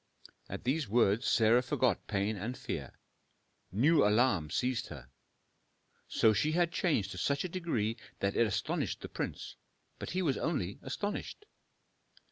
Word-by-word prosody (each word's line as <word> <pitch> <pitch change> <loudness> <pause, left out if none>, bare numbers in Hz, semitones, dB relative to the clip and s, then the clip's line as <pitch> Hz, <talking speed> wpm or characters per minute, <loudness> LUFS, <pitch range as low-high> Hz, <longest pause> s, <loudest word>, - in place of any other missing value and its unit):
At - - -6
these 135 -1 0
words 115 +1 +3
Sarah 115 +2 +5
forgot 125 -3 0
pain 100 +1 0
and 115 +6 -4
fear. - - -5 0.8
New 145 - +4
alarm 105 -7 +3
seized 125 +4 -1
her: 65 -5 -10 1.0
so 110 - +4
she 150 +10 +1
had 170 0 +2
changed 115 - 0
to 95 - -6
such 140 +8 0
a - - -2
degree 125 - -1 0.2
that 100 0 0
it 115 - +4
astonished 110 - -2
the - - -7
prince, - - -5 0.4
but - - -5
he 185 +1 -1
was 140 -6 +1
only 105 - -2
astonished. 205 - -4
120 Hz, 145 wpm, -32 LUFS, 105-150 Hz, 1.0 s, Sarah